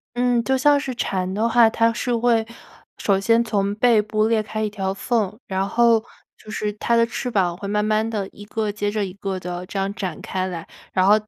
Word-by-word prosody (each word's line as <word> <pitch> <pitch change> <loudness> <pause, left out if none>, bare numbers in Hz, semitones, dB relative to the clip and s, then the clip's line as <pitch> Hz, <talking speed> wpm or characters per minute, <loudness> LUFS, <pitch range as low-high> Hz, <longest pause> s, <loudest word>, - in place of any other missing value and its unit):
嗯， 245 -1 +2
就 265 0 +1
像 285 +2 +4
是 270 -3 -4
蝉 185 -5 -2
的 215 +3 +1
话， 230 -1 +5
它 230 0 +2
是 245 0 -1
会 230 -1 +2 0.5
首 195 -2 +1
先 230 +4 +3
从 205 -3 0
背 225 0 +4
部 215 +1 0
裂 225 -1 +2
开 215 0 -4
一 215 - 0
条 195 -2 -2
缝， 215 -1 -1
然 190 0 -1
后 230 0 +3 0.3
就 215 - -15
是 210 0 -2
它 235 +2 0
的 230 0 +5
翅 235 +2 -4
膀 185 -6 +1
会 200 +2 -7
慢 210 +1 0
慢 215 +1 +1
地 205 -4 -2
一 205 - -13
个 215 0 -2
接 205 0 -2
着 205 -1 -1
一 185 - -7
个 195 -1 -4
地 180 0 -5
这 - - -6
样 195 +1 -1
展 190 -4 -4
开 185 0 -2
来。 170 -3 -6 0.2
然 185 0 +2
后， 205 - +7
215 Hz, 245 characters per minute, -22 LUFS, 195-230 Hz, 0.5 s, 后